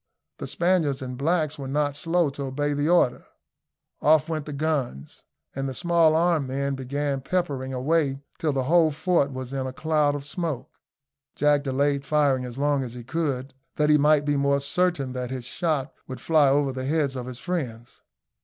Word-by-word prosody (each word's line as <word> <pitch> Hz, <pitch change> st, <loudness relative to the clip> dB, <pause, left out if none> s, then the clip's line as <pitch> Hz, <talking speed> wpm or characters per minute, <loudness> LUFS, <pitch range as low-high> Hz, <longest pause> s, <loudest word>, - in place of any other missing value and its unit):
The -, -, -5 dB
Spaniards 165 Hz, -7 st, +1 dB
and 125 Hz, 0 st, -5 dB
blacks 155 Hz, +2 st, 0 dB
were 135 Hz, -, -5 dB
not 145 Hz, +1 st, 0 dB
slow 165 Hz, 0 st, +1 dB
to 140 Hz, 0 st, -5 dB
obey 145 Hz, +2 st, -1 dB
the 145 Hz, +2 st, 0 dB
order. 170 Hz, -8 st, +3 dB, 0.8 s
Off 155 Hz, 0 st, +4 dB
went 155 Hz, -2 st, -3 dB
the -, -, -4 dB
guns, 140 Hz, -, -3 dB, 0.3 s
and 135 Hz, 0 st, -2 dB
the 130 Hz, -, -6 dB
small 170 Hz, 0 st, +3 dB
arm 165 Hz, -4 st, +2 dB
men 140 Hz, +1 st, -1 dB
began 135 Hz, +1 st, -2 dB
peppering 140 Hz, -4 st, -2 dB
away 135 Hz, +1 st, 0 dB, 0.2 s
till 155 Hz, -, +1 dB
the 135 Hz, -2 st, -1 dB
whole 165 Hz, +3 st, +4 dB
fort 150 Hz, -1 st, +1 dB
was 130 Hz, 0 st, -6 dB
in 135 Hz, -1 st, -2 dB
a -, -, -4 dB
cloud 150 Hz, -1 st, +1 dB
of 140 Hz, -1 st, -6 dB
smoke. 155 Hz, -3 st, -4 dB, 0.6 s
Jack 150 Hz, 0 st, +3 dB
delayed 140 Hz, +1 st, 0 dB
firing 140 Hz, -3 st, +2 dB
as 125 Hz, 0 st, -8 dB
long 145 Hz, 0 st, +1 dB
as 125 Hz, -2 st, -6 dB
he 120 Hz, -, -8 dB
could, 135 Hz, -2 st, -2 dB, 0.2 s
that 150 Hz, 0 st, +3 dB
he 150 Hz, -, +6 dB
might 150 Hz, 0 st, +4 dB
be 145 Hz, -1 st, +1 dB
more 140 Hz, 0 st, +2 dB
certain 140 Hz, -2 st, 0 dB
that 125 Hz, -1 st, -4 dB
his 130 Hz, -2 st, -5 dB
shot 145 Hz, -1 st, -1 dB
would 130 Hz, -, -7 dB
fly 155 Hz, -4 st, +4 dB
over 140 Hz, -1 st, +2 dB
the 130 Hz, 0 st, -4 dB
heads 145 Hz, -2 st, 0 dB
of 125 Hz, -1 st, -5 dB
his 125 Hz, -1 st, -7 dB
friends. 125 Hz, -9 st, -5 dB
140 Hz, 190 wpm, -25 LUFS, 130-155 Hz, 0.8 s, he